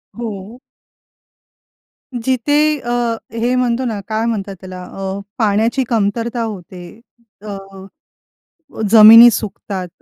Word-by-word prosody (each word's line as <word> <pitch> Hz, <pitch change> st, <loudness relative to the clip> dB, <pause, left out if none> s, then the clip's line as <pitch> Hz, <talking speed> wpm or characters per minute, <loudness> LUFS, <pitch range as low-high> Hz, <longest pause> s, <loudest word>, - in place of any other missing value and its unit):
हो. 220 Hz, 0 st, -7 dB, 1.5 s
जिथे 290 Hz, +5 st, 0 dB
अ, 240 Hz, -, -5 dB, 0.4 s
हे 235 Hz, +2 st, -1 dB
म्हणतो 250 Hz, 0 st, 0 dB
ना 220 Hz, -4 st, -3 dB
काय 220 Hz, +1 st, -2 dB
म्हणतात 200 Hz, -4 st, -3 dB
त्याला? 185 Hz, -1 st, -9 dB
अ, 195 Hz, +1 st, -6 dB, 0.2 s
पाण्याची 225 Hz, +4 st, +1 dB
कमतरता 230 Hz, +2 st, -1 dB
होते. 185 Hz, -2 st, -9 dB, 0.4 s
अ, 205 Hz, -2 st, -7 dB, 1.3 s
जमिनी 225 Hz, +2 st, +9 dB
सुकतात, 195 Hz, -3 st, -5 dB
225 Hz, 95 wpm, -17 LUFS, 200-240 Hz, 1.5 s, जमिनी